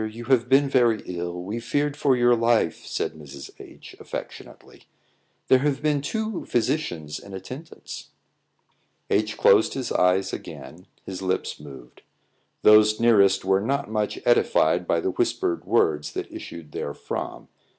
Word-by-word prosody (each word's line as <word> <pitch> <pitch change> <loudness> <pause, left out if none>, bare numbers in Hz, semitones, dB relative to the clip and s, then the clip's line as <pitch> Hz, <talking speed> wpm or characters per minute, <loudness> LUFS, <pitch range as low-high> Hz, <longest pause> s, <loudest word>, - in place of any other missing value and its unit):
You 115 +2 -9
have 125 -1 +2
been 140 +1 +5
very 120 -5 +2
ill; 90 0 -5
we 105 +5 -4
feared 145 +5 -1
for 140 -3 +2
your 120 0 +4
life," 115 -8 +1
said - - -2
Mrs. 70 -3 -11
H, - - -13
affectionately; - - -9 0.6
"there 130 - +5
have 145 +1 -1
been 150 -2 +1
two 220 +5 -3
physicians 100 - -2
in 100 -1 -10
attendance." 130 - -9 1.0
H - - +1
closed 475 -3 +4
his 130 -3 -4
eyes 90 +1 +2
again; 80 +2 -9 0.2
his 95 -1 -6
lips 95 -1 -2
moved. 70 -4 -13 0.6
Those 105 0 +6
nearest 100 -5 +4
were 95 0 +3
not 140 +1 -2
much 105 -1 -1
edified - - +3
by - - +1
the - - -1
whispered 85 - -1
words 75 -2 +1
that - - -5
issued 80 -3 -9
therefrom. 70 - -5
110 Hz, 140 wpm, -24 LUFS, 90-130 Hz, 1.0 s, Those